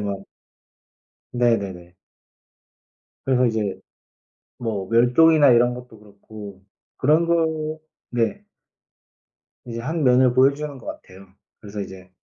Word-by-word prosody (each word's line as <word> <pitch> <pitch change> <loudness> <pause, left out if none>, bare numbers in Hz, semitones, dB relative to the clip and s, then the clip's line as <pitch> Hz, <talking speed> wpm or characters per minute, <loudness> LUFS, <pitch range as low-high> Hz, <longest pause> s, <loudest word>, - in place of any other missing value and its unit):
막 100 -1 -3 1.1
네네네. 100 -8 -1 1.3
그래서 130 -1 +3
이제 105 -5 -1 0.8
뭐 105 -5 -4
멸종이나 140 +6 +5
이런 120 +1 +4
것도 125 -3 -11
그렇고 100 -1 -12 0.4
그런 155 +5 +3
거 160 -2 -1 0.3
네. 115 -3 -1 1.2
이제 115 -1 -6
한 155 +4 -2
면을 125 -1 +4
보여주는 140 +3 +2
것 125 - -15
같아요. 95 +1 -10 0.3
그래서 105 -1 -7
이제 95 -1 -10
120 Hz, 210 characters per minute, -22 LUFS, 100-140 Hz, 1.3 s, 멸종이나